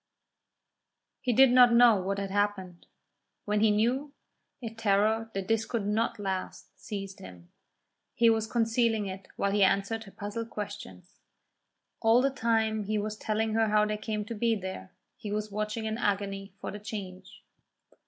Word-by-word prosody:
He 250 - 0
did 260 +2 +6
not 250 -1 +7
know 235 -2 +7
what 195 +2 -2
had 200 -1 -3
happened. 195 -3 -2 0.6
When 210 0 +1
he 220 +1 +4
knew, 245 +7 +1 0.5
a 230 -3 -6
terror 220 +1 +1
that 195 -1 -3
this 225 0 +1
could 225 -3 -3
not 220 +3 0
last 190 -2 -5
seized 195 -2 -6
him. 90 -2 -13 0.6
He 235 - +4
was 225 -1 +3
concealing 225 -2 +1
it 190 0 -7
while 200 - 0
he 205 0 +3
answered 200 +4 +1
her 195 - -13
puzzled 210 +4 -5
questions. 200 - -8 0.8
All 225 +2 +5
the 275 +2 +2
time 220 -4 0
he 215 +1 -1
was 210 +1 -3
telling 220 0 -1
her 225 0 +2
how 210 0 +3
they 210 0 -1
came 210 -1 -3
to 230 - -5
be 230 +1 +1
there, 190 - -7 0.3
he 210 - -7
was 210 0 -3
watching 215 +2 -3
in 220 +1 -3
agony 195 -2 -2
for - - -5
the 205 - -7
change. 200 -3 -8
215 Hz, 165 wpm, -29 LUFS, 200-225 Hz, 0.8 s, not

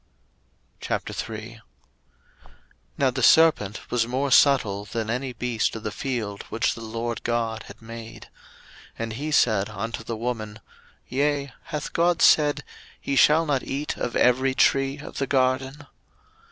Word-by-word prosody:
01:003:001 115 +1 -5 1.4
Now 135 -2 +2
the 130 +1 -3
serpent 125 -9 +4
was 115 -2 +1
more 130 +3 -1
subtil 115 -8 +4
than 115 -1 -3
any 125 +2 -2
beast 120 -2 -1
of 110 - -7
the 110 - -3
field 110 -6 -4
which 115 +2 0
the 115 - -10
LORD 115 +1 -4
God 115 -2 -2
had - - -13
made. 115 0 -10 0.7
And 115 -1 -4
he 145 +7 -4
said 110 -9 +2
unto 115 +3 -5
the 115 0 -5
woman, 110 -2 -4 0.5
Yea, 140 0 -1
hath 150 -3 -5
God 170 0 +2
said, 150 -1 +4 0.4
Ye 140 - -1
shall 155 +4 +5
not 140 -4 0
eat 140 +2 -3
of 120 - -4
every 130 +2 +3
tree 135 +1 +2
of 150 - -8
the 135 - -1
garden? 130 +1 0
125 Hz, 140 wpm, -24 LUFS, 115-140 Hz, 1.4 s, shall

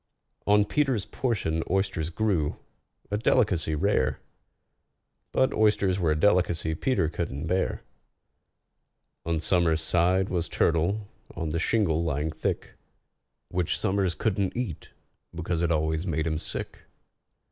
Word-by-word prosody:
On 105 0 +5
PETER'S 135 -5 +1
portion 90 -10 -1
oysters 95 -4 0
grew—a 95 +1 -3
delicacy 100 -10 +2
rare, 85 -6 +1 1.1
But 130 - +2
oysters 100 -3 +2
were 85 -3 +2
a 75 0 +1
delicacy 85 -4 +2
PETER 105 +1 +1
couldn't 75 -3 -4
bear. 95 +1 -1 1.4
On 85 -1 +1
SOMERS' 85 -1 +2
side 90 +4 +2
was 85 -2 -1
turtle, 90 +6 +1 0.3
on 80 -1 -3
the 80 +2 -1
shingle 85 -5 +1
lying 80 -1 -1
thick, - - -3 0.8
Which 90 -2 0
SOMERS 95 -3 0
couldn't 100 +3 -1
eat, 115 -11 -4 0.5
because 85 -1 -2
it 85 -1 +1
always 80 +2 0
made 80 -2 0
him 80 -1 -1
sick. - - -6
90 Hz, 120 wpm, -27 LUFS, 80-100 Hz, 1.4 s, On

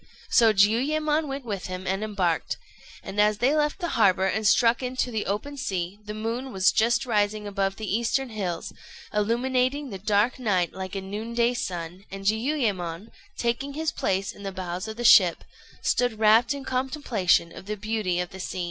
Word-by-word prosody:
So 230 -3 +6
Jiuyémon 295 +10 +2
went 275 -1 -5
with 200 -4 -4
him 185 0 -6
and 195 +3 -1
embarked; 190 -6 -1 0.5
and 205 +2 -1
as 210 0 +3
they 265 +7 +2
left 300 -1 +1
the 345 -3 -3
harbour 190 - +3
and 215 +2 +1
struck 235 +2 +4
into 255 0 -2
the 220 -2 -2
open 280 +9 -3
sea, 190 -6 -3
the 210 0 -6
moon 230 +5 -3
was 190 -1 +3
just 235 +3 +2
rising 210 -2 0
above 195 -1 -1
the 220 - -6
eastern 245 +3 0
hills, 190 -6 -4 0.4
illumining 255 +5 0
the 195 - -6
dark 210 +6 +1
night 190 -8 +1
like 190 0 -6
a 195 - -2
noonday 230 +5 -1
sun; 180 -4 -5
and 195 0 -8
Jiuyémon, 215 - -1 0.3
taking 245 +4 -1
his 315 +2 -1
place 195 +1 -1
in - - -14
the 195 -1 -4
bows 185 +1 -5
of 220 0 -7
the 240 - -4
ship, 185 -7 +6 0.4
stood 245 -3 +1
wrapt 220 +2 +5
in 280 -1 -3
contemplation 255 - 0
of 190 - -11
the 210 0 -3
beauty 210 -4 -1
of 180 0 -3
the 190 - -10
scene. 185 - -5
215 Hz, 185 wpm, -26 LUFS, 195-245 Hz, 0.5 s, So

